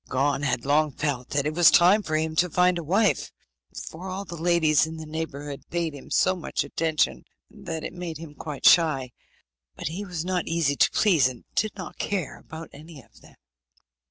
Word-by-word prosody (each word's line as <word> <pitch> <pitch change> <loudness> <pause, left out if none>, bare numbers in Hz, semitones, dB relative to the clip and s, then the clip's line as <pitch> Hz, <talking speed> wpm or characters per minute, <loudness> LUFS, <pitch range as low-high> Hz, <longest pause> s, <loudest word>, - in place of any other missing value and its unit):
Gon 140 +2 +1
had 130 -4 -1
long 150 +2 +3
felt 140 -3 -3
that 140 0 0
it 155 - -1
was 175 +1 +7
time 185 +5 +5
for 155 -6 -3
him 160 0 -2
to 180 +2 +3
find 180 +1 +2
a - - -5
wife, 195 +7 +1 0.6
for 180 +4 -8
all 195 +2 -5
the 170 - -8
ladies 160 -2 +3
in 160 0 -7
the 160 - -7
neighbourhood 145 -3 -5
paid 170 -2 -2
him 140 - -11
so 185 - +3
much 175 - -3
attention 160 -2 0 0.3
that 170 -7 -6
it - - -5
made 175 -3 -6
him 160 -2 -10
quite 150 -2 -7
shy; 150 -7 +5 0.6
but - - -4
he 180 +6 -5
was 175 -4 -5
not 185 -1 -1
easy 165 -4 +1
to - - +4
please, 170 - +4
and 125 -2 -8
did 215 0 0
not 185 -3 -9
care 190 -7 -3
about 160 +1 -10
any 155 +1 -12
of 125 - -20
them. - - -18
160 Hz, 200 wpm, -25 LUFS, 145-175 Hz, 0.6 s, was